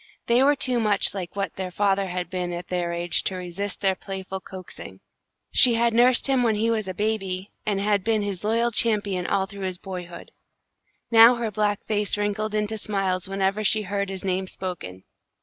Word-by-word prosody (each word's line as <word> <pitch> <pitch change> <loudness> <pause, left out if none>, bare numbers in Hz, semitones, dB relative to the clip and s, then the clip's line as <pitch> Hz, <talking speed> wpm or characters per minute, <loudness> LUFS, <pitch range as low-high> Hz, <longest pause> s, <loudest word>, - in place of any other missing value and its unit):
They 235 +2 +3
were 285 +2 +5
too 255 -3 0
much 210 -3 +1
like 185 -2 -6
what 200 -1 -3
their 190 -1 -3
father 195 +1 +1
had 180 0 -4
been 180 -1 -2
at 175 0 -6
their 175 -1 -1
age 170 0 0
to 190 - -1
resist 185 +3 -5
their 195 -1 +3
playful 190 0 -6
coaxing. 185 -1 -10 0.5
She 245 -3 +6
had 235 0 +2
nursed 240 +1 +4
him 270 -2 +2
when 230 -3 +2
he 225 +2 +1
was 215 -3 -1
a 185 - -3
baby, 195 -2 -2 0.2
and 205 -2 +1
had 200 -1 +1
been 220 -1 +1
his 200 -2 -4
loyal 230 +3 +1
champion 205 -5 +1
all 190 - +1
through 200 +1 -10
his 185 -1 -2
boyhood. 180 -2 -8 0.8
Now 230 +2 +8
her 235 -2 -3
black 205 0 0
face 210 -1 0
wrinkled 210 +1 -1
into 215 +1 -1
smiles 195 -3 -1
whenever 195 +2 0
she 215 +1 +2
heard 200 0 -2
his 190 -1 -6
name 190 0 -1
spoken. 160 - -6
200 Hz, 195 wpm, -24 LUFS, 185-215 Hz, 0.8 s, Now